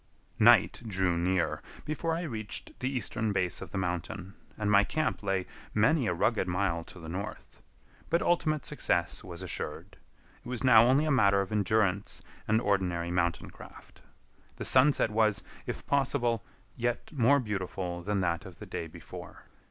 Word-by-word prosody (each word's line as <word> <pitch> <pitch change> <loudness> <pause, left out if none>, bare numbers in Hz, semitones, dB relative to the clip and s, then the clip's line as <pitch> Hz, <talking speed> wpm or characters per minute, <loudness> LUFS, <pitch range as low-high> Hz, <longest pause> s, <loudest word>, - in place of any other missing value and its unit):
Night - - +6
drew 95 -4 +1
near 85 -1 0 0.2
before 160 +2 -1
I 170 - -3
reached 110 - -4
the 130 - -1
eastern 115 -4 -1
base 90 -3 -1
of 95 - -7
the 95 - -5
mountain, 90 +1 -3 0.2
and 105 -1 0
my 100 0 +6
camp 155 +8 -1
lay 95 -2 -1 0.3
many 130 +4 +3
a - - +1
rugged 105 +2 +1
mile 90 -2 0
to 95 - -12
the 80 - -9
north; 100 +6 -7 0.5
but 170 - +3
ultimate 155 -3 +1
success 85 -12 0
was 90 0 -8
assured. 90 - -5 0.5
It - - -9
was 125 +1 -3
now 115 -3 +7
only 135 +4 +4
a 155 - +1
matter 100 -7 +4
of 100 - -5
endurance 105 -1 +1 0.2
and 110 +1 +3
ordinary 90 -5 0
mountain 85 -1 0
craft. - - -14 0.5
The - - -6
sunset 130 -3 +4
was, 105 -2 +2 0.2
if - - -5
possible, 125 -5 +1 0.3
yet 120 0 -2
more 140 -1 +4
beautiful 95 -5 -3
than 100 +1 -1
that 85 0 0
of 95 -3 -11
the - - -9
day 85 - -5
before. 80 - -11
100 Hz, 165 wpm, -30 LUFS, 90-125 Hz, 0.5 s, now